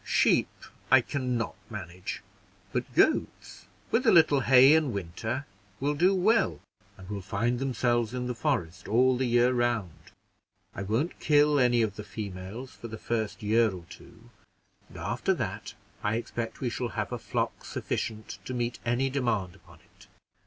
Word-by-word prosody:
Sheep -, -, +3 dB, 0.4 s
I 130 Hz, 0 st, +7 dB
can 125 Hz, 0 st, -2 dB
not 115 Hz, -, -2 dB, 0.2 s
manage, 90 Hz, -4 st, -6 dB, 0.5 s
but -, -, -2 dB
goats, -, -, +1 dB, 0.2 s
with 250 Hz, +2 st, +2 dB
a -, -, +7 dB
little 160 Hz, -6 st, +6 dB
hay 130 Hz, +2 st, +7 dB
in 155 Hz, -4 st, +3 dB
winter, 110 Hz, +7 st, -4 dB, 0.3 s
will 145 Hz, +2 st, 0 dB
do 180 Hz, +6 st, +3 dB
well, 215 Hz, +5 st, +2 dB, 0.4 s
and 95 Hz, -1 st, -12 dB
will 100 Hz, 0 st, -4 dB
find 115 Hz, +6 st, -1 dB
themselves 120 Hz, -3 st, 0 dB
in 125 Hz, 0 st, -3 dB
the 125 Hz, -, -2 dB
forest 115 Hz, -, -2 dB
all 125 Hz, +4 st, +4 dB
the 130 Hz, +1 st, 0 dB
year 120 Hz, +1 st, +3 dB
round. 120 Hz, -7 st, 0 dB, 0.8 s
I -, -, -6 dB
won't 115 Hz, -, -1 dB
kill 150 Hz, -1 st, +4 dB
any 120 Hz, -2 st, +4 dB
of 105 Hz, -2 st, -3 dB
the 105 Hz, -, -5 dB
females 100 Hz, +3 st, -7 dB
for 115 Hz, -, -9 dB
the 110 Hz, -1 st, -7 dB
first 110 Hz, -2 st, -3 dB
year 110 Hz, +2 st, +3 dB
or 90 Hz, -3 st, -8 dB
two, 120 Hz, +2 st, -15 dB, 0.6 s
and -, -, -12 dB
after -, -, -1 dB
that -, -, -5 dB, 0.3 s
I 105 Hz, +2 st, 0 dB
expect 115 Hz, 0 st, -4 dB
we 125 Hz, -3 st, -1 dB
shall 120 Hz, +1 st, -3 dB
have -, -, -2 dB
a -, -, -3 dB
flock -, -, -3 dB
sufficient 110 Hz, -1 st, -4 dB
to 130 Hz, -, -4 dB
meet 120 Hz, 0 st, -2 dB
any 120 Hz, +3 st, +1 dB
demand 115 Hz, -9 st, -1 dB
upon -, -, -19 dB
it." -, -, -21 dB
120 Hz, 165 wpm, -28 LUFS, 110-130 Hz, 0.8 s, I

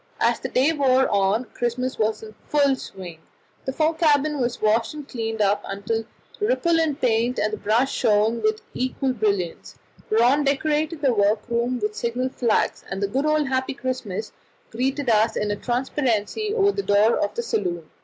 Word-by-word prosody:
As -, -, +2 dB
the -, -, -5 dB
day 275 Hz, +6 st, +2 dB
wore 265 Hz, -3 st, +3 dB
on 200 Hz, +4 st, +1 dB
Christmas 250 Hz, +2 st, -2 dB
was 220 Hz, 0 st, 0 dB
in 215 Hz, 0 st, -10 dB
full 280 Hz, -2 st, +3 dB
swing. 185 Hz, -9 st, -9 dB, 0.5 s
The 265 Hz, -, -1 dB
fore 310 Hz, +4 st, +1 dB
cabin 300 Hz, -2 st, +2 dB
was 240 Hz, -1 st, -1 dB
washed 220 Hz, +6 st, +1 dB
and 295 Hz, -2 st, -8 dB
cleaned 225 Hz, -4 st, -3 dB
up 205 Hz, 0 st, +2 dB, 0.2 s
till 225 Hz, 0 st, -1 dB, 0.3 s
the 420 Hz, -, +1 dB
Ripolin 330 Hz, -, +2 dB
paint 240 Hz, +1 st, +1 dB
and 215 Hz, +1 st, 0 dB
the -, -, -2 dB
brass 230 Hz, +7 st, +1 dB
shone 220 Hz, 0 st, +2 dB
with 215 Hz, 0 st, 0 dB
equal 260 Hz, +1 st, -1 dB
brilliance; 200 Hz, -7 st, -2 dB, 0.3 s
Rönne 245 Hz, +7 st, +4 dB
decorated 300 Hz, +3 st, 0 dB
the 265 Hz, -3 st, +4 dB
workroom 235 Hz, +4 st, +1 dB
with 210 Hz, -2 st, -3 dB
signal 245 Hz, +3 st, -2 dB
flags, 240 Hz, -3 st, 0 dB
and 195 Hz, -, -4 dB
the 200 Hz, -, 0 dB
good 270 Hz, +8 st, -1 dB
old 305 Hz, -2 st, +1 dB
"Happy 260 Hz, 0 st, -1 dB
Christmas" 245 Hz, -6 st, -4 dB, 0.4 s
greeted 265 Hz, +4 st, -1 dB
us 220 Hz, 0 st, +3 dB
in 210 Hz, 0 st, -1 dB
a -, -, 0 dB
transparency 255 Hz, -, -1 dB
over 405 Hz, -2 st, +3 dB
the 400 Hz, -, -2 dB
door 210 Hz, -, +3 dB
of -, -, -1 dB
the 475 Hz, -, -2 dB
saloon. 175 Hz, -, -2 dB
245 Hz, 175 wpm, -23 LUFS, 215-280 Hz, 0.5 s, Rönne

